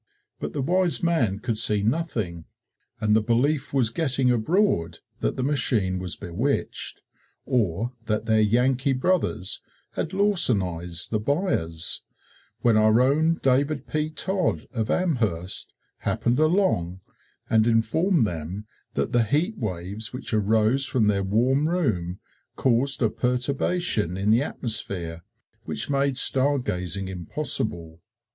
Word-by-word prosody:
But - - -5
the 140 - -2
wise 180 +3 +2
man 130 - +1
could 110 0 -2
see 105 -2 +3
nothing 110 - -2 0.5
and 105 -1 +2
the 110 - +3
belief 130 +6 0
was 125 -5 +1
getting 135 -3 +2
abroad 115 - 0 0.2
that - - -2
the 130 - -2
machine 115 -9 +1
was 90 -4 -1
bewitched, 115 +12 -2 0.4
or 115 -2 -1
that 110 0 -1
their 110 -1 +2
Yankee 125 +5 +1
brothers 130 - 0 0.3
had 160 - -4
lawsonized 100 - +1
the 110 - 0
buyers, 105 - +1 0.6
when 115 -3 +3
our 110 +1 +4
own 155 +6 +2
David 140 +3 +1
P. 155 0 -2
Todd, 185 +3 -1
of 110 -3 -3
Amherst, 110 - +1 0.3
happened 120 +3 -1
along 155 - +1 0.5
and 110 0 +2
informed 120 - +2
them 90 +3 -6 0.3
that 70 - -1
the 120 - +3
heat 155 - 0
waves 100 0 -4
which 125 -2 -4
arose 110 +5 +2
from 125 -6 +1
their 100 -1 +1
warm 130 +10 +1
room 100 - -2 0.4
caused 130 +2 +2
a 110 - +3
perturbation 125 - 0
in 100 +2 0
the 115 +3 +4
atmosphere 95 - -1 0.4
which 80 - +1
made 140 -1 0
star 140 +2 +3
gazing 90 -5 -2
impossible. 90 - -1
115 Hz, 130 wpm, -24 LUFS, 100-140 Hz, 0.6 s, our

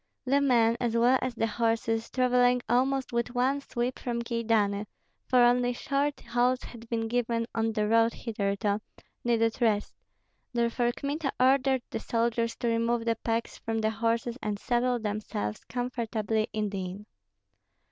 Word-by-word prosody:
The 275 +2 +3
men, 235 -4 +3
as 235 -1 0
well 245 +3 +4
as 255 -1 -2
the 225 - +1
horses, 225 0 0
travelling 250 -1 +3
almost 260 +2 +1
with 235 +1 -1
one 265 +3 +1
sweep 245 -1 -3
from 235 -1 -2
Kyedani 220 -3 0 0.4
(for 250 -1 +5
only 245 0 +3
short 280 +3 -1
halts 245 +2 +1
had 230 -1 -11
been 225 -1 -1
given 230 -1 0
on 225 0 0
the 210 -1 0
road 230 +1 +4
hitherto), 205 -2 -1 0.4
needed 230 0 +1
rest; 210 -3 +1 0.6
therefore 235 0 +1
Kmita 285 +2 -2
ordered 265 0 +3
the - - -2
soldiers 230 0 0
to 240 - -3
remove 230 0 +1
the 230 -1 +2
packs 230 0 -2
from 225 0 -3
the 220 0 +1
horses 230 +2 -1
and 210 -1 -2
settle 245 +3 +1
themselves 205 - -3
comfortably 225 -3 -2
in 215 -1 -1
the 195 -2 -3
inn. 185 +3 -7
235 Hz, 155 wpm, -28 LUFS, 225-245 Hz, 0.6 s, for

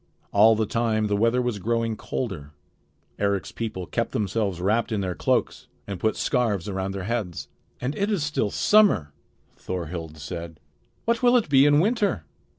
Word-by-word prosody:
All 110 +2 +6
the 110 0 0
time 110 0 0
the 105 -1 0
weather 115 +4 +2
was 120 -4 -2
growing 115 +2 0
colder. 85 - -5 0.7
Eric's 100 -1 0
people 105 -5 -4
kept - - -2
themselves 100 -3 -1
wrapped 110 +6 +1
in 105 -2 0
their 90 -2 -2
cloaks - - -1 0.2
and 100 -3 -6
put 110 +3 +1
scarfs 110 -8 0
around 95 -1 -3
their 95 -1 -4
heads. 105 -5 -3 0.3
"And 130 +4 -3
it 200 +1 0
is 200 -8 0
still 150 -8 0
summer!" 200 - +3 0.4
Thorhild 85 -3 -5
said. 80 +2 -7 0.5
"What 235 0 +1
will 250 0 +5
it 220 -10 -1
be 140 0 +6
in 145 0 +5
winter?" 205 - +1
110 Hz, 165 wpm, -25 LUFS, 95-125 Hz, 0.7 s, All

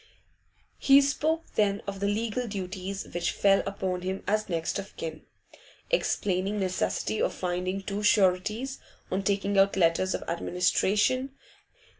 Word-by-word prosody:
He 275 0 +7
spoke 310 +4 0
then 205 -1 +1
of 195 -1 -5
the 200 - 0
legal 225 +3 -1
duties 195 -1 -5
which 175 0 0
fell 195 -1 +3
upon 190 -2 -2
him 190 +1 -4
as 215 0 0
next 165 -2 -1
of 195 - -9
kin, 160 -1 -6 0.6
explaining 200 - 0
the 205 - -2
necessity 110 - -1
of - - 0
finding 185 +2 -2
two 200 +1 -3
sureties 210 +5 +2 0.3
on 190 - 0
taking 200 0 +1
out 195 0 +4
letters 185 +1 +2
of - - -5
administration. 205 +9 +1
195 Hz, 140 wpm, -28 LUFS, 185-210 Hz, 0.6 s, He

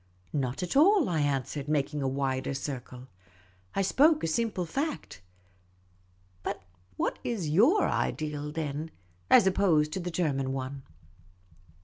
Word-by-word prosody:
" 90 0 -34
Not 135 +2 -2
at 180 - -3
all," 365 +4 +5
I 165 -3 0
answered, 140 0 -1
making 150 0 0
a 135 - 0
wider 135 0 -1
circle. 130 -2 -6 0.3
" 95 0 -30
I 195 - +2
spoke 300 - +4
a - - +1
simple 200 +1 -1
fact. 275 - -4 1.2
But - - -4 0.3
what - - -2
iajotir 225 - +3
ideal, 150 -1 -2
then, 155 0 -3 0.4
as - - +7
opposed 175 -6 +3
to - - -2
the 180 0 -4
German 140 -6 -1
one 135 +1 -5
150 Hz, 135 wpm, -29 LUFS, 135-190 Hz, 1.2 s, as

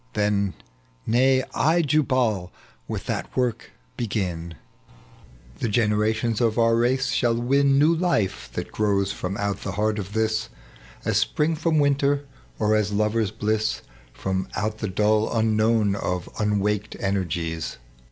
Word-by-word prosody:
19 105 0 +2
Tlien 100 -1 0 0.3
— - - -35
Nay, 130 +2 +4
I 165 +3 +3
Jubal 130 - +1 0.4
will - - -3
that - - -4
work 125 -3 -1 0.3
begiu 90 -7 -2
I - - -16 1.0
The - - -1
generations 110 +1 +1
of 115 -1 +2
our 115 -1 +4
race 130 +3 +1
shall 120 -4 +2
win 135 +3 +3
New 150 +4 +5
life, 160 - 0
that - - -5
grows 100 -2 +1
from 95 +2 -4
out 100 -1 -2
the 100 - -4
heart 105 +1 0
of 100 0 -6
this, 110 0 0 0.6
Aa - - 0
apxing 155 +2 +1
from 160 0 +1
winter, 140 0 +2 0.3
or 110 0 +2
as 105 -1 +1
lovers' 105 +1 +1
bliss 110 0 -1 0.3
From 95 +9 -3
out 110 +1 -2
the 105 - -2
dull 105 +3 +2
unknown 110 -1 +2
of 90 -3 -3
unwaked 105 0 0
energies." 85 -6 -2
110 Hz, 145 wpm, -24 LUFS, 100-125 Hz, 1.0 s, New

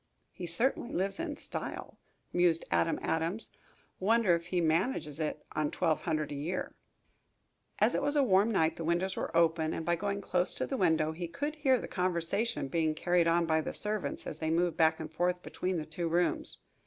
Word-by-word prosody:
"He 175 - -7
certainly 235 +8 0
lives 195 - -1
in 330 -3 -3
style," - - -6 0.3
mused 175 -2 +3
Adam 85 0 +2
Adams. 165 +7 -1 0.5
"Wonder 220 -1 +3
if 170 0 -1
he 180 0 0
manages 160 - 0
it 155 -1 -3
on 155 -1 0
twelve 165 -3 0
hundred 155 -3 -1
a - - -3
year?" 165 +6 -3 1.0
As - - +3
it - - +1
was 290 +1 +1
a 285 - +5
warm 200 -2 +4
night 160 -6 +2
the 165 - -4
windows 175 +3 0
were 165 - -2
open 165 -1 +2
and 160 - -4
by 175 +1 +2
going 200 +3 -2
close 180 -2 0
to - - -1
the 270 - -3
house 160 -6 +2
he 175 -1 -3
could 290 - -4
hear 265 -4 +3
the - - -6
conversation 180 0 -1
being 160 +1 0
carried 175 +1 +2
on 170 0 +3
by 160 -1 +2
the - - -5
servants 210 -1 -3
as - - -6
they 160 - -1
moved 170 0 +1
back 160 -1 +3
and 160 0 -7
forth 180 +2 0
between 185 0 -2
the 155 - -3
two 165 +2 -3
rooms. 175 +2 +1
170 Hz, 200 wpm, -31 LUFS, 160-190 Hz, 1.0 s, a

